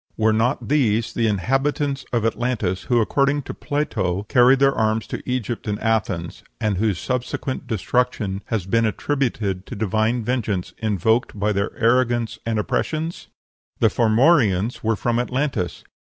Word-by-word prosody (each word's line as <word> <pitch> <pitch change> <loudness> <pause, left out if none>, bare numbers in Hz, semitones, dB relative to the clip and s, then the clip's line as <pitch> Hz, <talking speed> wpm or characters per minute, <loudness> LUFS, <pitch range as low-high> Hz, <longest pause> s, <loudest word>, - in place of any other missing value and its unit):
Were 110 0 +3
not 115 +5 0
these 115 -5 +1
the 115 -1 +1
inhabitants 135 +7 0
of 115 -3 0
Atlantis, 115 -6 -1
who, 120 -1 +2
according 140 +5 +1
to - - -6
Plato, 105 - -2
carried 125 +4 +5
their 135 0 +4
arms 110 -1 0
to - - -5
Egypt 120 -2 -3
and 105 0 -2
Athens, 105 -7 -1 0.2
and 105 -3 0
whose 105 -2 +1
subsequent 125 +4 -3
destruction 110 -2 -1
has 110 -6 -2
been 115 +3 +2
attributed 110 -7 -2
to - - -6
divine 110 +3 0
vengeance 110 -6 -2
invoked 110 +1 0
by 105 +1 +1
their 100 +1 -1
arrogance 120 -1 +1
and 115 -1 0
oppressions? 160 +9 -2 0.5
The - - +4
Formorians 115 - +3
were 110 0 +2
from 120 +3 0
Atlantis. 125 -6 -2
115 Hz, 145 wpm, -22 LUFS, 105-125 Hz, 0.5 s, carried